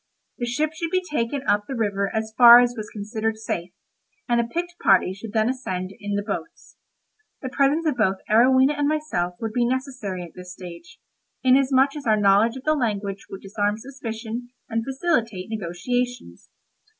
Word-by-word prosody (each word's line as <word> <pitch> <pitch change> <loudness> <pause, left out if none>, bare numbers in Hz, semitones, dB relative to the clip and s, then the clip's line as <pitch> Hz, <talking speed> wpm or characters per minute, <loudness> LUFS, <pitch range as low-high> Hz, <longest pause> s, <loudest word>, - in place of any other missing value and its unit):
The 240 - -2
ship 300 +6 0
should 330 +1 -3
be 370 +2 0
taken 265 0 -1
up 205 0 +2
the 270 - -4
river 200 -3 0
as 220 0 -3
far 240 -1 +10
as 245 0 +2
was 215 -2 -6
considered 220 +1 -3
safe, 175 -5 -4 0.6
and 240 -1 +3
a - - -2
picked 345 +8 -4
party 190 -1 +4
should 205 +3 -9
then 220 0 +2
ascend 190 -8 -3
in 205 0 -3
the 205 - -1
boats. 225 +10 -6 0.7
The 260 - -3
presence 280 +5 +2
both 195 -5 +2
of - - -23
Arowhena 260 +5 +5
and 290 - +2
myself 295 -14 -1
would 225 -1 -4
be 245 - +2
necessary 250 -7 -3
at 170 - -11
this 180 0 -10
stage, 180 - -11 0.4
inasmuch 265 +1 +4
as 285 -4 -6
our 215 -1 +4
knowledge 205 +4 +3
of 260 - -10
the 310 - +2
language 205 -7 -2
would 195 - -8
disarm 205 +1 -1
suspicion, 235 -1 -6 0.2
and 225 -1 -2
facilitate 240 - -1
negotiations. 245 +6 -3
230 Hz, 175 wpm, -23 LUFS, 205-260 Hz, 0.7 s, far